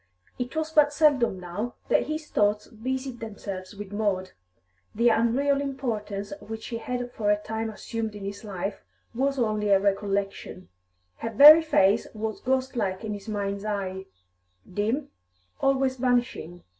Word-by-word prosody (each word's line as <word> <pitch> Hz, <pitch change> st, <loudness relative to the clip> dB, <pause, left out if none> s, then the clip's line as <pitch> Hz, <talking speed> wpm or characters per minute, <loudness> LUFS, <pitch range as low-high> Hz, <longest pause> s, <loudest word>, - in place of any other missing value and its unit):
It 245 Hz, +4 st, -4 dB
was 315 Hz, 0 st, -1 dB
but 300 Hz, -2 st, +5 dB
seldom 285 Hz, -10 st, +3 dB
now 180 Hz, +7 st, -5 dB
that -, -, +2 dB
his 310 Hz, 0 st, -3 dB
thoughts 210 Hz, -3 st, +1 dB
busied 260 Hz, +2 st, -4 dB
themselves 200 Hz, -3 st, -7 dB
with 205 Hz, -1 st, -8 dB
Maud; 200 Hz, -3 st, -1 dB, 0.6 s
the 235 Hz, +2 st, +4 dB
unreal 260 Hz, +5 st, +2 dB
importance 220 Hz, -7 st, -3 dB
which 220 Hz, -3 st, -8 dB
she 230 Hz, -, -4 dB
had 245 Hz, +1 st, -4 dB
for 210 Hz, -3 st, -1 dB
a 210 Hz, -, +4 dB
time 220 Hz, +1 st, -4 dB
assumed 220 Hz, 0 st, -5 dB
in 200 Hz, -1 st, -7 dB
his 200 Hz, +2 st, -6 dB
life 200 Hz, -1 st, -5 dB, 0.3 s
was 275 Hz, +3 st, 0 dB
only 215 Hz, -4 st, 0 dB
a 195 Hz, -1 st, +6 dB
recollection; 195 Hz, -1 st, -2 dB, 0.5 s
her 230 Hz, -, -4 dB
very 295 Hz, +8 st, +10 dB
face 215 Hz, -9 st, +3 dB
was 215 Hz, 0 st, -4 dB
ghostlike 250 Hz, -7 st, -1 dB
in 215 Hz, -1 st, -3 dB
his 205 Hz, +2 st, -8 dB
mind's 200 Hz, -1 st, -2 dB
eye, 190 Hz, -3 st, -3 dB, 0.7 s
dim, 225 Hz, +9 st, -1 dB, 0.5 s
always 270 Hz, -1 st, +2 dB
vanishing. 245 Hz, -9 st, -1 dB
220 Hz, 145 wpm, -26 LUFS, 200-260 Hz, 0.7 s, very